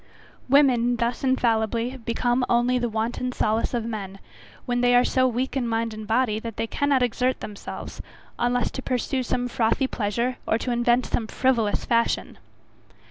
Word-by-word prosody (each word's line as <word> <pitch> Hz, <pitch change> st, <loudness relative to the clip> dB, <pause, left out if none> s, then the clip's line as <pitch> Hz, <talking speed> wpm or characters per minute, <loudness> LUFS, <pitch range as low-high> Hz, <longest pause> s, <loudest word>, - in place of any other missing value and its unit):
Women 250 Hz, -4 st, +4 dB
thus 235 Hz, +2 st, -2 dB
infallibly 235 Hz, -1 st, +1 dB
become 240 Hz, +1 st, 0 dB
only 240 Hz, +1 st, +2 dB
the 240 Hz, -1 st, -1 dB
wanton 230 Hz, +3 st, -2 dB
solace 220 Hz, +2 st, 0 dB
of 235 Hz, -2 st, -2 dB
men, 200 Hz, -4 st, -5 dB, 0.5 s
when 245 Hz, -1 st, 0 dB
they 245 Hz, 0 st, +4 dB
are 245 Hz, 0 st, +5 dB
so 255 Hz, 0 st, +2 dB
weak 255 Hz, +3 st, -2 dB
in 255 Hz, -3 st, 0 dB
mind 225 Hz, 0 st, -1 dB
and 215 Hz, -1 st, -8 dB
body, 225 Hz, -1 st, +1 dB
that 230 Hz, -1 st, -7 dB
they -, -, 0 dB
cannot 275 Hz, +2 st, +1 dB
exert 250 Hz, +2 st, 0 dB
themselves, 205 Hz, -1 st, -7 dB, 0.4 s
unless 245 Hz, 0 st, +1 dB
to 265 Hz, -, -5 dB
pursue 260 Hz, +1 st, -1 dB
some 245 Hz, 0 st, -1 dB
frothy 235 Hz, +2 st, +1 dB
pleasure, 235 Hz, +1 st, -1 dB
or 220 Hz, -, +2 dB
to 245 Hz, -, -3 dB
invent 240 Hz, +1 st, +2 dB
some 225 Hz, -, -2 dB
frivolous 230 Hz, -4 st, +1 dB
fashion. 230 Hz, 0 st, 0 dB
240 Hz, 165 wpm, -24 LUFS, 225-250 Hz, 0.5 s, are